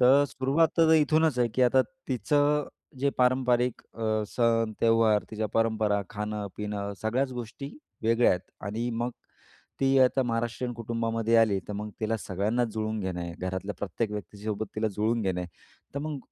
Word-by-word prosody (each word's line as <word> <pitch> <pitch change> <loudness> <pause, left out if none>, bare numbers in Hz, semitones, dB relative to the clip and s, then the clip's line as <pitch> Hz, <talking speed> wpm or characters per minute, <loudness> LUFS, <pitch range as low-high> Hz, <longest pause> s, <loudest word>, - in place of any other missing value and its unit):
तर 135 +3 +6
सुरुवात 140 +5 +2
तर 165 - +7
आता 160 - +6
इथूनच 155 -2 +3
आहे, 120 -1 +3
की 130 - +3
आता 125 +1 +5 0.3
तिचं 145 +4 +2 0.3
जे 140 +2 +2
पारंपरिक 125 -1 +2
अ, 110 -1 0
सण, 115 -2 +1
त्यौहार, 115 -2 +4
तिच्या 110 0 -2
परंपरा, 110 -2 +2
खाणं-पिणं 105 -1 -4
सगळ्याच 130 +5 0
गोष्टी 125 +3 -6 0.3
वेगळ्या 115 +2 +4
आहेत. 90 - +1 0.3
आणि 115 +4 -2
मग 120 +1 -2 0.7
ती 135 0 +4
आता 130 +1 +4
महाराष्ट्रीयन 120 +1 -2
कुटुंबामध्ये 115 0 0
आली 110 -4 +4
तर - - -3
मग 105 +1 -4
तिला 110 +1 0
सगळ्यांनाच 105 +5 -1
जुळवून 110 0 -2
घेणं 95 -2 -3
आहे. 85 -1 -5
घरातल्या 95 +2 -3
प्रत्येक 105 +3 -2
व्यक्तीच्यासोबत 105 +2 -4
तिला 110 0 +1
जुळवून 110 +3 +1
घेणं 95 -2 -1
आहे. 90 - -5 0.5
तर - - -1
मग 150 -1 -4
115 Hz, 160 wpm, -28 LUFS, 105-125 Hz, 0.7 s, तर